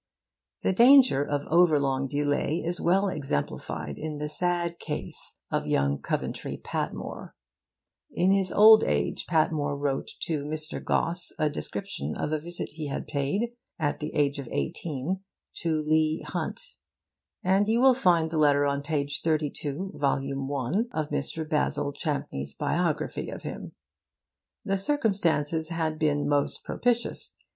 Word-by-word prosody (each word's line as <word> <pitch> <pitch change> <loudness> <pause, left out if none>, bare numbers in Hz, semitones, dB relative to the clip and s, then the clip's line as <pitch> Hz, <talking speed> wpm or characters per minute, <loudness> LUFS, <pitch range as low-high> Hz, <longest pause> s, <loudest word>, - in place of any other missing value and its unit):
The - - +2
danger 245 - +7
of 145 0 -2
over 170 -3 +5
long 135 -1 0
delay 145 +2 0
is 175 +1 -2
well 190 +4 +3
exemplified 105 - -3
in 155 -1 -4
the 150 +1 -3
sad 170 +2 -1
case - - -5 0.2
of - - -1
young 70 0 +1
Coventry - - -3
Patmore. - - -5 0.8
In 180 +2 +2
his 195 -1 +2
old 215 +1 +8
age - - -1
Patmore 155 -3 +1
wrote 140 -1 -1
to 160 -4 -1
Mr. 155 +2 -4
Gosse 175 +2 0
a 155 -1 +1
description 110 - -4
of 150 - -2
a 155 - 0
visit 170 +3 -5
he 155 0 -6
had 140 - -4
paid, 175 +13 -1 0.2
at 145 -4 -1
the 150 - -4
age 140 -1 +1
of 130 -4 -6
eighteen, 145 - -2 0.4
to 160 -2 0
Leigh 155 +1 +2
Hunt; - - -5 0.7
and 195 +3 +3
you 225 +2 +2
will 260 +1 +7
find 175 -9 +3
the 160 - 0
letter 145 -1 +4
on 140 0 0
page 145 -1 -2
32, 155 +2 -1
vol. 145 - 0
I, 140 - -2
of 155 -1 -2
Mr. 150 +2 -1
Basil 150 -2 0
Champneys' 135 - -3
biography - - -1
of - - -7
him. - - -6 0.9
The 195 - +1
circumstances 170 - +1
had 160 -2 -2
been 145 -2 +1
most 145 -1 0
propitious. 240 -1 -1
155 Hz, 145 wpm, -27 LUFS, 145-180 Hz, 0.9 s, old